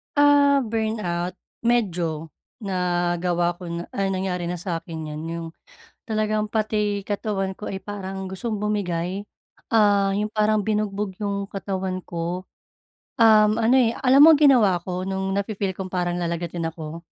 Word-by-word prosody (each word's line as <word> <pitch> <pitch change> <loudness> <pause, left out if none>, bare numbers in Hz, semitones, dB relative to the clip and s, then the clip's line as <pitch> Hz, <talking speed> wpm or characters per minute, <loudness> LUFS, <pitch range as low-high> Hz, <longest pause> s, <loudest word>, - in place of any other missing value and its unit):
Ah, 285 -1 +5
burnout 215 -6 -2 0.3
medyo 170 -9 0 0.3
nagawa 175 -2 0
ko 180 - -9
na 170 0 -4
ay 195 -1 -1
nangyari 185 -2 -2
na 175 - -2
sa'kin 165 -2 -5
'yan, 150 +1 -6
yung 165 0 -4 0.6
talagang 215 -1 0
pati 210 -2 0
katawan 200 -2 -2
ko 210 - -8
ay 195 - -4
parang 190 -2 -6
gustong 210 +3 -3
bumigay, 195 -3 -2 0.5
ah, 205 -3 +4
yung 210 +1 0
parang 215 0 +2
binugbog 210 -2 -1
yung 200 -1 -2
katawan 190 -1 -3
ko. 175 +2 -4 0.8
Um, 215 -1 +6
ano, 230 +3 +4
eh, 235 -3 +3
alam 270 +2 +5
mo 325 - +9
ang 295 - 0
ginawa 240 -11 +5
ko 180 0 -4
nung 190 0 -2
nafi-feel 200 -1 -2
kong 185 -1 -6
parang 175 -1 -1
lalagnatin 170 -1 -2
ako, 160 +1 -8
195 Hz, 145 wpm, -23 LUFS, 175-215 Hz, 0.8 s, mo